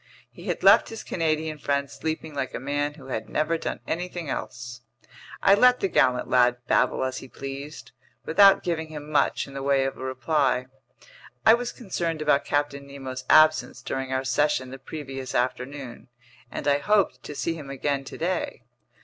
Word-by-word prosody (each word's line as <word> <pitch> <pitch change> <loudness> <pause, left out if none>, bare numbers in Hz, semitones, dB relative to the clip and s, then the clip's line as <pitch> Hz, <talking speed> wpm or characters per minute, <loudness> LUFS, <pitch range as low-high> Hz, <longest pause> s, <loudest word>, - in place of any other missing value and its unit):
He - - -13
had - - -2
left - - +7
his 225 - -7
Canadian 155 -2 -1
friend 140 0 0
sleeping 160 +1 -5
like 140 -2 -3
a - - -3
man 145 +2 -2
who 135 -3 -13
had 110 -3 -4
never 155 +2 0
done - - -4
anything 175 -2 -4
else. 120 0 -6 0.6
I 195 - +7
let 250 +4 +5
the - - +1
gallant 130 -8 +2
lad 125 -1 +4
babble 130 - +2
as 130 0 -2
he 135 - -11
pleased, 140 +3 -8 0.3
without 195 +4 +6
giving 165 -2 -2
him 150 -1 -8
much 150 - +2
in 140 - -12
the 135 - -5
way 135 -1 +2
of 135 - -3
a - - -7
reply. 130 0 0 0.8
I 220 - +9
was 240 +1 0
concerned 170 -8 -3
about 150 -2 +2
Captain 145 -1 -1
Nemo's 130 -2 -7
absence 155 0 +5
during 135 0 -3
our 130 0 0
session 130 0 +1
the 135 - -8
previous 135 -2 -7
afternoon, 125 0 -3 0.4
and 145 - -5
I 145 0 +4
hoped 205 +5 +2
to 150 - -8
see 165 - -1
him 150 -4 -9
again 140 0 -1
today. 170 -2 -3
145 Hz, 175 wpm, -25 LUFS, 130-160 Hz, 0.8 s, I